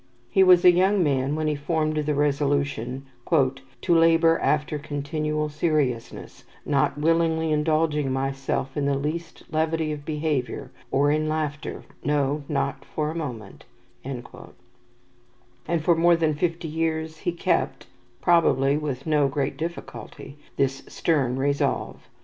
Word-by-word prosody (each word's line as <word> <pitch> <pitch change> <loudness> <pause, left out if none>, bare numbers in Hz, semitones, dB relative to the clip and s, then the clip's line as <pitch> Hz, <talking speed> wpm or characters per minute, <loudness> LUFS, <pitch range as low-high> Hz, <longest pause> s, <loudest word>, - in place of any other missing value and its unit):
He 190 - +4
was 180 -2 +6
a 180 - +10
young 190 +2 +3
man 140 -1 +1
when 155 0 -1
he 155 - +1
formed 155 +1 -1
the 150 -1 0
resolution, 140 -3 0 0.2
"to 135 0 0
labour 165 0 +5
after 150 0 0
continual 150 +1 -2
seriousness, 150 -6 -2 0.2
not 140 0 +1
willingly 160 +1 +1
indulging 150 -2 +1
myself 135 0 -2
in 145 - -1
the 140 0 +1
least 165 +4 -4
levity 160 0 0
of 150 -1 -5
behaviour, 150 -4 -2 0.2
or 145 +2 +2
in 155 +1 0
laughter, 155 -1 -3 0.2
no, 145 0 0
not 135 -1 -1
for 150 +1 -3
a - - -8
moment"; 120 -11 -6 0.4
and 130 -2 -6 1.6
for 170 +1 +4
more 170 +1 +5
than 160 -2 +1
fifty 165 +2 -2
years 160 0 -2
he 175 - -1
kept 170 - -1 0.4
probably 145 -5 +3
with 140 -4 -4
no 150 -3 +3
great 140 0 -2
difficulty 160 -2 -7 0.2
this 135 0 0
stern 135 -7 0
resolve. 140 +1 -1
150 Hz, 130 wpm, -25 LUFS, 140-160 Hz, 1.6 s, a